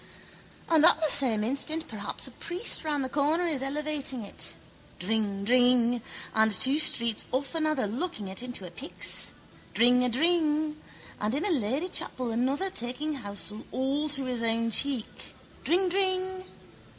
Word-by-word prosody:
And 320 -2 +4
at 320 - +6
the 315 -1 +2
same 245 -8 +3
instant 310 +7 0
perhaps 205 -2 -4
a 265 - -5
priest 350 - +1
round 295 -3 -1
the - - -2
corner 300 +6 +1
is 305 -6 -1
elevating 280 -3 -2
it. 200 - -4 0.4
Dringdring! 230 +4 +2 0.3
And 220 0 +3
two 265 +8 +3
streets 235 -7 +2
off 265 +3 -2
another 310 -6 0
locking 225 - -4
it 190 +2 -4
into 245 -6 -4
a 175 - -9
pyx. 275 - +1 0.4
Dringadring! 300 +6 +3 0.4
And 215 +4 -1
in 300 - -1
a 410 - +2
ladychapel 255 - -1
another 270 +11 0
taking 255 +5 -4
housel 210 -3 -6
all 275 +4 -1
to 275 -2 -1
his 250 -2 -2
own 230 0 0
cheek. 265 -1 -1 0.3
Dringdring! 375 +1 +1
265 Hz, 140 wpm, -28 LUFS, 230-310 Hz, 0.4 s, at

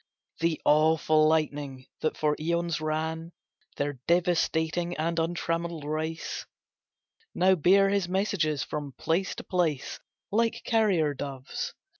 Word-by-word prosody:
The 165 -1 +1
awful 155 0 +4
lightning 145 -4 -1
that 155 - -1
for 150 -1 +1
eons 170 0 -1
ran 160 +2 -2 0.4
Their 145 -2 -2
devastating 175 0 +1
and 165 +2 0
untrammelled 165 -1 -2
race, 155 +2 -3 0.9
Now 185 +1 +5
bear 190 +4 +4
his 195 -3 0
messages 180 -7 0
from 145 -3 -5
place 175 +7 -1
to - - -7
place 165 -7 -1 0.3
Like 230 +2 +1
carrier 195 -10 +2
doves. 135 -1 -5
160 Hz, 115 wpm, -28 LUFS, 155-175 Hz, 0.9 s, Now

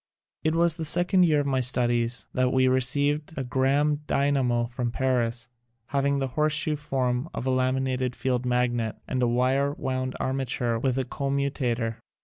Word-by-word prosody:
It 155 +1 +1
was 170 0 +3
in 165 - -7
the - - -1
second 175 +4 +3
ye 160 - +2
ir 145 - +3
of - - -4
my 135 -2 +1
studies 120 -1 +1
that 130 0 +1
we 130 0 +3
received 145 +4 +1
a 135 - -1
Gramme 135 +4 +1
dynamo 135 -4 +1
from 120 0 -3
Paris, 120 -2 -1 0.4
having 140 0 +1
the 135 -1 -1
horseshoe 155 +2 +1
form 130 -1 -2
of - - -4
a 130 - +1
lami 130 +1 +1
nated 130 -1 -2
field 125 -2 -1
magnet, 120 -2 0
and 130 -1 -1
a 125 - +3
Wire 130 +4 +1
wound 130 -2 -3
arma 135 0 -1
ture 120 -2 -1
with 130 +1 0
a 130 - 0
commutator. 135 -5 -2
130 Hz, 180 wpm, -26 LUFS, 125-140 Hz, 0.4 s, was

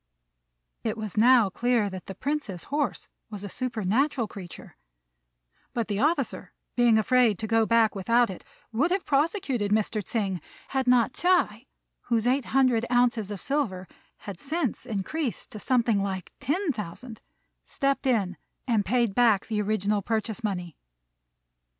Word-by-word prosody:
It - - -2
was 215 -3 -5
now 230 -2 +5
clear 240 0 +1
that 185 -2 -7
the 195 - -6
Prince's 260 - -3
horse 290 -3 -1 0.2
was 205 -2 -7
a - - -4
supernatural 235 +3 0
creature; 185 -4 -10 1.0
but 235 -2 -1
the 205 -1 -1
officer, 310 +7 0 0.2
being 240 -2 +5
afraid 235 -1 +3
to 220 - -4
go 225 0 +2
back 230 -2 +4
without 230 +3 +2
it, 185 - -10 0.3
would 265 +10 +1
have 375 +1 0
prosecuted 275 - 0
Mr. 215 0 +1
Tsêng, 195 -4 -2 0.3
had 265 -1 -1
not 245 0 +4
Ts'ui, 310 - +1 0.4
whose 230 -2 +1
eight 255 +1 +2
hundred 255 -4 +3
ounces 240 -4 +2
of 205 -2 -5
silver 200 -11 -2 0.3
had 200 -4 -9
since 295 - -2
increased 230 +6 -3
to 215 - -8
something 235 -4 +2
like 190 -2 -4
ten 310 +6 0
thousand, 220 +1 -7 0.4
stepped 275 0 -1
in 200 -8 +1 0.3
and 225 -4 +2
paid 235 0 +1
back 225 -4 +4
the 215 -2 -1
original 210 0 0
purchase 220 +2 -2
money. 180 -6 -3
230 Hz, 145 wpm, -27 LUFS, 205-255 Hz, 1.0 s, now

